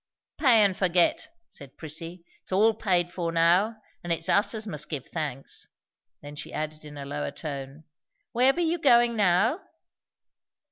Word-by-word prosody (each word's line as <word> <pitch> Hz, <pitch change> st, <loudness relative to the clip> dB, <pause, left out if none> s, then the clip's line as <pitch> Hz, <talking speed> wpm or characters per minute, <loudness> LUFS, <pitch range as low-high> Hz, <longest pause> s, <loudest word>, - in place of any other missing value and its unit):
"Pay 240 Hz, -7 st, +6 dB
and 195 Hz, -2 st, +3 dB
forget!" 180 Hz, -, +2 dB, 0.2 s
said 140 Hz, -2 st, -13 dB
Prissy. 165 Hz, +3 st, -9 dB, 0.2 s
"It's -, -, -14 dB
all 215 Hz, +4 st, +4 dB
paid 180 Hz, -5 st, 0 dB
for 170 Hz, -2 st, -3 dB
now; 175 Hz, +7 st, +3 dB, 0.3 s
and 175 Hz, -, -4 dB
it's 165 Hz, 0 st, -1 dB
us 205 Hz, +3 st, +3 dB
as 215 Hz, 0 st, -4 dB
must 150 Hz, -7 st, -4 dB
give 145 Hz, -5 st, -4 dB
thanks." 145 Hz, -5 st, -5 dB, 0.6 s
Then 145 Hz, 0 st, -9 dB
she 155 Hz, -, -8 dB
added 155 Hz, 0 st, -5 dB
in 150 Hz, -1 st, -10 dB
a 140 Hz, -, -7 dB
lower 75 Hz, -, -4 dB
tone, 140 Hz, -, -7 dB, 0.5 s
"Where 255 Hz, +3 st, +4 dB
be 345 Hz, +5 st, -2 dB
you 335 Hz, +1 st, 0 dB
goin' 240 Hz, -5 st, +4 dB
now?" 210 Hz, -, +2 dB
175 Hz, 160 wpm, -26 LUFS, 150-220 Hz, 0.6 s, Pay